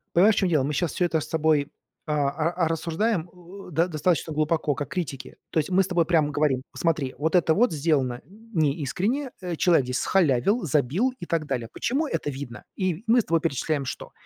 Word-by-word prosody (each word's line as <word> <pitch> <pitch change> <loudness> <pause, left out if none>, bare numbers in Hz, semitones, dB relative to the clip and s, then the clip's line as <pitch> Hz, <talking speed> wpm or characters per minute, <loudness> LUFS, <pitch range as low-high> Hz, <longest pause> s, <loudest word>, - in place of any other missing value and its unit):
Понимаешь, 200 +5 +6
в - - -8
чём 190 - +1
дело, 155 -5 +2
мы 145 +3 -1
щас 170 +2 -1
всё 180 - +1
это 165 -2 +1
с - - -6
тобой, 155 -2 +1 0.3
а, 150 -2 +1
а, 165 +3 0
рассуждаем, 170 +3 -1
э, 180 +2 -13
до 165 +3 +2
достаточно 165 0 0
глубоко, 155 -1 0
как 145 0 -4
критики. 140 -7 -5
То - - +2
есть 155 - -2
мы 185 - +3
с 190 - -1
тобой 175 -3 +2
прямо 160 -4 +2
говорим: 145 -3 +1
"Смотри, 150 -6 -1
вот 160 +4 0
это 170 -2 +4
вот 245 +5 +3
сделано 140 -6 0 0.3
неискренне, 175 - 0
э, 180 -2 -3
человек 165 -5 +3
здесь 125 +1 -2
схалявил, 185 - +2
забил 155 - +1
и - - -4
так 165 -2 -1
далее". 125 -4 -2
Почему 290 +6 -1
это 145 - -2
видно? 135 -3 -7
И 185 0 -2
мы 235 +2 +5
с - - -14
тобой 165 0 +2
перечисляем 145 -2 -1
что? 125 - -6
160 Hz, 205 wpm, -25 LUFS, 145-180 Hz, 0.3 s, Понимаешь